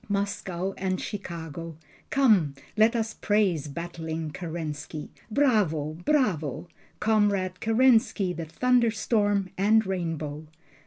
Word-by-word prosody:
Moscow 195 Hz, -2 st, -2 dB
and 185 Hz, -1 st, -1 dB
Chicago! 165 Hz, -5 st, -6 dB, 0.3 s
Come 205 Hz, -, +3 dB, 0.2 s
let 220 Hz, +2 st, +4 dB
us 225 Hz, -1 st, -1 dB
praise 195 Hz, -8 st, +1 dB
battling 160 Hz, 0 st, -5 dB
Kerensky, 155 Hz, -2 st, -6 dB, 0.2 s
Bravo! 205 Hz, -, +2 dB
Bravo! 175 Hz, -, 0 dB, 0.3 s
Comrade 200 Hz, -4 st, +1 dB
Kerensky 225 Hz, -5 st, +3 dB
the 165 Hz, -, -4 dB
thunderstorm 215 Hz, -2 st, +1 dB
and 220 Hz, +2 st, +4 dB
rainbow! 160 Hz, -5 st, -3 dB
185 Hz, 95 wpm, -27 LUFS, 160-215 Hz, 0.3 s, let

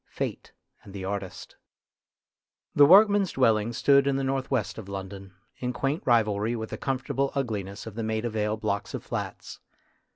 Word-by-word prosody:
FATE -, -, -5 dB, 0.3 s
AND 100 Hz, -, -13 dB
THE 95 Hz, -1 st, -5 dB
ARTIST 100 Hz, -1 st, -6 dB, 1.2 s
THE 145 Hz, -1 st, +7 dB
workmen's 200 Hz, +1 st, +6 dB
dwellings 115 Hz, -2 st, +2 dB
stood 140 Hz, -1 st, +4 dB
in 140 Hz, -, +2 dB
the 135 Hz, -, -1 dB
north 135 Hz, 0 st, -1 dB
west 130 Hz, -4 st, -1 dB
of 100 Hz, -3 st, -9 dB
London, 95 Hz, -1 st, -7 dB, 0.2 s
in 125 Hz, 0 st, -3 dB
quaint 135 Hz, +6 st, -1 dB
rivalry 110 Hz, -1 st, +2 dB
with 110 Hz, -1 st, -5 dB
the -, -, -4 dB
comfortable 135 Hz, +1 st, -1 dB
ugliness 105 Hz, -7 st, -3 dB
of 110 Hz, -, -8 dB
the 115 Hz, -, -4 dB
Maida 110 Hz, +1 st, -2 dB
Vale 105 Hz, 0 st, -1 dB
blocks 105 Hz, -2 st, -3 dB
of -, -, -6 dB
flats. -, -, -6 dB
115 Hz, 165 wpm, -27 LUFS, 105-135 Hz, 1.2 s, THE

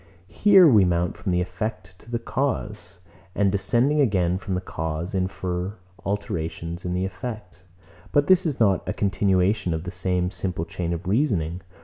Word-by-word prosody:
Here 195 Hz, -, +7 dB
we 110 Hz, -9 st, +6 dB
mount 90 Hz, -1 st, 0 dB
from 95 Hz, -, -3 dB
the 90 Hz, 0 st, +2 dB
effect 95 Hz, 0 st, -5 dB
to 115 Hz, -, -17 dB
the 120 Hz, -, -1 dB
cause; 105 Hz, -8 st, -3 dB, 0.3 s
and 100 Hz, -1 st, +2 dB
descending 120 Hz, +9 st, +2 dB
again 95 Hz, -7 st, +2 dB
from 95 Hz, -1 st, -3 dB
the -, -, 0 dB
cause, 80 Hz, 0 st, -4 dB
infer 95 Hz, 0 st, -2 dB, 0.3 s
alterations 85 Hz, -3 st, -3 dB
in 90 Hz, 0 st, -2 dB
the 90 Hz, +1 st, 0 dB
effect; 100 Hz, -2 st, -7 dB, 0.5 s
but 145 Hz, 0 st, +3 dB
this 185 Hz, +1 st, +5 dB
is 155 Hz, -6 st, -2 dB
not 100 Hz, -5 st, +2 dB
a -, -, 0 dB
continuation 95 Hz, -1 st, +1 dB
of 80 Hz, -, -4 dB
the 90 Hz, -, -5 dB
same 90 Hz, -1 st, -1 dB
simple 90 Hz, -5 st, -2 dB
chain 85 Hz, 0 st, -4 dB
of 85 Hz, +2 st, -4 dB
reasoning. 95 Hz, -, 0 dB
95 Hz, 165 wpm, -24 LUFS, 90-105 Hz, 0.5 s, Here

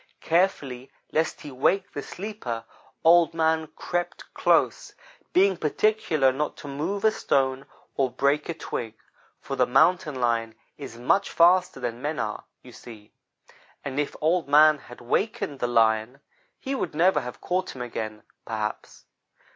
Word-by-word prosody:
Carefully, 150 Hz, -8 st, 0 dB, 0.2 s
lest 160 Hz, +1 st, -1 dB
he 145 Hz, -, -8 dB
wake 185 Hz, +9 st, +1 dB
the 145 Hz, -, -4 dB
sleeper, 175 Hz, -, -6 dB, 0.4 s
Old 170 Hz, 0 st, +5 dB
man 160 Hz, -1 st, +1 dB
crept 175 Hz, 0 st, -4 dB
close, -, -, +1 dB, 0.4 s
being 190 Hz, +1 st, +4 dB
particular 155 Hz, -4 st, +1 dB
not 145 Hz, +3 st, -3 dB
to -, -, -10 dB
move 160 Hz, +9 st, -3 dB
a 220 Hz, -, +6 dB
stone 135 Hz, -8 st, 0 dB, 0.3 s
or 135 Hz, -2 st, +2 dB
break 140 Hz, +5 st, 0 dB
a 170 Hz, -, -2 dB
twig; 115 Hz, -7 st, -5 dB, 0.4 s
for 135 Hz, -, -5 dB
the 125 Hz, -1 st, +2 dB
Mountain 150 Hz, +4 st, +3 dB
lion 115 Hz, -2 st, 0 dB, 0.2 s
is 135 Hz, -5 st, -9 dB
much 125 Hz, +11 st, +1 dB
faster 175 Hz, -3 st, +4 dB
than 120 Hz, -1 st, -4 dB
men 150 Hz, +2 st, -2 dB
are, 105 Hz, -, -4 dB, 0.2 s
you -, -, -13 dB
see; 105 Hz, -3 st, -13 dB, 0.7 s
and 140 Hz, 0 st, -3 dB
if 150 Hz, -, -2 dB
Old 165 Hz, +2 st, +1 dB
man 150 Hz, +1 st, +6 dB
had 125 Hz, -2 st, -13 dB
wakened 145 Hz, -, -1 dB
the 120 Hz, -, 0 dB
Lion, 115 Hz, +2 st, +2 dB, 0.4 s
he 270 Hz, -, -4 dB
would 180 Hz, -, -3 dB
never 180 Hz, +4 st, +3 dB
have 125 Hz, 0 st, -8 dB
caught 185 Hz, -2 st, -2 dB
him 125 Hz, -, -5 dB
again, 110 Hz, -3 st, -6 dB, 0.2 s
perhaps. 110 Hz, -1 st, -5 dB
145 Hz, 150 wpm, -25 LUFS, 125-170 Hz, 0.7 s, a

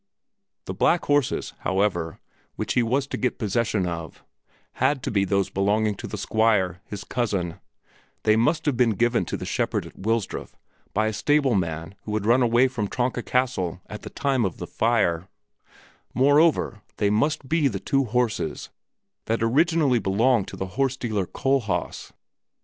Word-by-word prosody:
The -, -, -4 dB
black 175 Hz, -, +2 dB
horses, 145 Hz, -2 st, +1 dB
however, 95 Hz, -4 st, -1 dB, 0.4 s
which -, -, -2 dB
he 125 Hz, -, +3 dB
was 130 Hz, +4 st, +1 dB
to -, -, -5 dB
get 125 Hz, -, -1 dB
possession 105 Hz, -2 st, 0 dB
of, 85 Hz, -4 st, -6 dB, 0.6 s
had 140 Hz, -3 st, +2 dB
to -, -, -2 dB
be 100 Hz, -2 st, +2 dB
those 100 Hz, 0 st, 0 dB
belonging 105 Hz, +2 st, +1 dB
to -, -, -6 dB
the -, -, -5 dB
Squire, 100 Hz, -6 st, +1 dB
his 105 Hz, 0 st, -7 dB
cousin; 100 Hz, -9 st, -2 dB, 0.6 s
they 110 Hz, -, +4 dB
must 150 Hz, +9 st, +1 dB
have 145 Hz, -4 st, +1 dB
been 120 Hz, -3 st, +2 dB
given 120 Hz, +3 st, +2 dB
to -, -, -3 dB
the -, -, -6 dB
shepherd -, -, -1 dB
at -, -, -13 dB
Wilsdruf 110 Hz, 0 st, -2 dB, 0.4 s
by 110 Hz, +2 st, +2 dB
a 110 Hz, -, -1 dB
stable 145 Hz, +2 st, +2 dB
man 85 Hz, -2 st, -2 dB
who 105 Hz, -, -3 dB
had 105 Hz, -1 st, -2 dB
run 120 Hz, +4 st, +4 dB
away 120 Hz, +2 st, +4 dB
from 115 Hz, -5 st, -3 dB
Tronka 125 Hz, +3 st, -1 dB
Castle 120 Hz, -10 st, -1 dB
at 105 Hz, -, -8 dB
the -, -, -8 dB
time 135 Hz, -3 st, 0 dB
of 95 Hz, -6 st, -2 dB
the -, -, -5 dB
fire; 100 Hz, -7 st, +1 dB, 0.9 s
moreover, 145 Hz, -4 st, +3 dB, 0.2 s
they 100 Hz, -1 st, +2 dB
must 140 Hz, +5 st, 0 dB
be 160 Hz, -1 st, +2 dB
the 100 Hz, -7 st, -3 dB
two 135 Hz, +5 st, +1 dB
horses 120 Hz, -1 st, -1 dB, 0.6 s
that 115 Hz, 0 st, 0 dB
originally 145 Hz, +2 st, +3 dB
had 115 Hz, -, -3 dB
belonged 110 Hz, +2 st, +2 dB
to -, -, -8 dB
the 95 Hz, -, -3 dB, 0.2 s
horse 135 Hz, -1 st, +1 dB
dealer 105 Hz, -7 st, -2 dB
Kohlhaas. 115 Hz, -11 st, -1 dB
115 Hz, 170 wpm, -24 LUFS, 100-130 Hz, 0.9 s, they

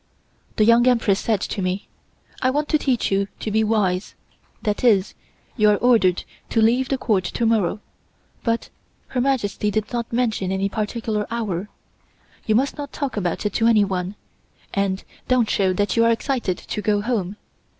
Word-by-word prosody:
The 215 Hz, -, +3 dB
Young 235 Hz, +2 st, +5 dB
Empress 225 Hz, -6 st, +3 dB
said 215 Hz, -4 st, 0 dB
to 205 Hz, -, -3 dB
me: 185 Hz, +2 st, -2 dB, 0.5 s
"I 255 Hz, -, +3 dB
want 295 Hz, +3 st, -1 dB
to 310 Hz, -, +3 dB
teach 255 Hz, -8 st, 0 dB
you 195 Hz, 0 st, +1 dB
to 215 Hz, -, -3 dB
be 220 Hz, +1 st, +2 dB
wise, 205 Hz, -4 st, 0 dB, 0.5 s
that 210 Hz, 0 st, -1 dB
is, 210 Hz, -6 st, +3 dB, 0.4 s
you 215 Hz, -3 st, +4 dB
are 210 Hz, -, +5 dB
ordered 215 Hz, -7 st, +3 dB, 0.3 s
to 230 Hz, -, +1 dB
leave 240 Hz, +4 st, +3 dB
the 270 Hz, -, +1 dB
Court 205 Hz, -7 st, +1 dB
to 230 Hz, +6 st, -1 dB
morrow, 215 Hz, -3 st, +1 dB, 0.6 s
but 230 Hz, -1 st, -1 dB, 0.4 s
Her 250 Hz, -, -1 dB
Majesty 230 Hz, -6 st, 0 dB
did 215 Hz, +2 st, -2 dB
not 235 Hz, -1 st, -3 dB
mention 225 Hz, -6 st, 0 dB
any 195 Hz, +1 st, 0 dB
particular 215 Hz, 0 st, -2 dB
hour. 210 Hz, -5 st, -3 dB, 0.8 s
You 215 Hz, -, +3 dB
must 275 Hz, +5 st, 0 dB
not 285 Hz, -1 st, -5 dB
talk 280 Hz, -3 st, -3 dB
about 185 Hz, -1 st, -2 dB
it 205 Hz, -, 0 dB
to 230 Hz, -, +2 dB
anyone, 195 Hz, -4 st, +2 dB, 0.6 s
and 195 Hz, -1 st, 0 dB, 0.2 s
don't 255 Hz, -3 st, +3 dB
show 190 Hz, -2 st, +2 dB
that 205 Hz, +2 st, 0 dB
you 230 Hz, -, +4 dB
are 230 Hz, -, +4 dB
excited 230 Hz, -5 st, -1 dB
to 210 Hz, -, -5 dB
go 205 Hz, 0 st, +1 dB
home. 210 Hz, -4 st, -2 dB
215 Hz, 175 wpm, -22 LUFS, 200-235 Hz, 0.8 s, Young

